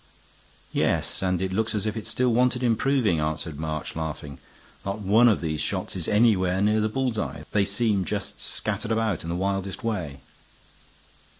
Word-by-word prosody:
"Yes, - - 0
and 90 -1 0
it 95 0 -2
looks 110 +2 0
as 105 - -1
if 110 - -1
it 110 - -4
still 125 -1 +1
wanted 125 +1 +2
improving," 120 - +2
answered 75 0 -2
March, 80 -2 -4
laughing. 75 -3 -5 0.4
"Not 100 +1 -2
one 105 +4 +5
of 105 - +2
these 80 -2 -2
shots - - -2
is - - -3
anywhere 100 -4 +3
near 105 +2 +3
the 110 - +1
bull's 125 -1 -1
eye; - - -4
they 100 -2 +3
seem 100 -1 +1
just - - -4
scattered 110 +1 -2
about 110 -5 0
in 85 - -6
the 85 - -1
wildest 95 0 -2
way." 90 -11 -3
100 Hz, 175 wpm, -26 LUFS, 85-110 Hz, 0.4 s, one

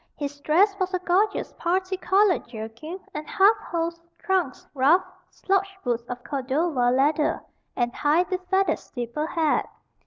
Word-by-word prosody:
His 285 0 -5
dress 370 +8 +3
was 370 0 0
a - - -1
gorgeous 365 +4 +1
parti 370 +2 0
colored 380 0 +2
jerkin 235 - -7
and 300 0 -6
half 400 +3 +5
hose, 335 0 -3 0.2
trunks, 365 -9 -1
ruff, 300 +7 +4 0.3
slouch 390 0 -1
boots 240 -1 -2
of 245 0 -6
Cordova 270 -1 0
leather, 290 +5 +2 0.3
and 240 -1 0
high 305 +4 +2
befeathered 370 +1 0
steeple 245 +5 -4
hat. 320 -3 +1
330 Hz, 135 wpm, -25 LUFS, 270-370 Hz, 0.3 s, half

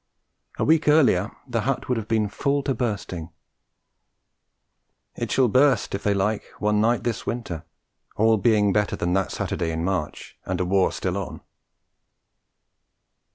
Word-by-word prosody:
A - - 0
week 160 0 +3
earlier 125 - +4 0.2
the 115 -3 -1
hut 130 +4 -2
would 125 - +1
have 110 - -7
been 110 -2 +1
full 140 +7 -1
to 135 - 0
bursting; 100 -8 -3 1.9
it - - -4
shall 130 -2 +4
burst 130 +4 +3
if 100 - -2
they 100 -1 +1
like 100 +2 0
one 105 0 +1
night 115 +2 +2
this 115 -3 -3
winter 90 -9 -4 0.5
all 110 +1 +4
being 105 -1 +3
better 105 0 +1
than 90 +1 -1
that 95 0 0
Saturday 85 -2 -2
in 80 0 -3
March 90 -5 -3
and 95 -1 -3
a 90 - 0
war 95 +1 +2
still 95 0 -2
on! 100 -3 -6
105 Hz, 155 wpm, -24 LUFS, 95-120 Hz, 1.9 s, earlier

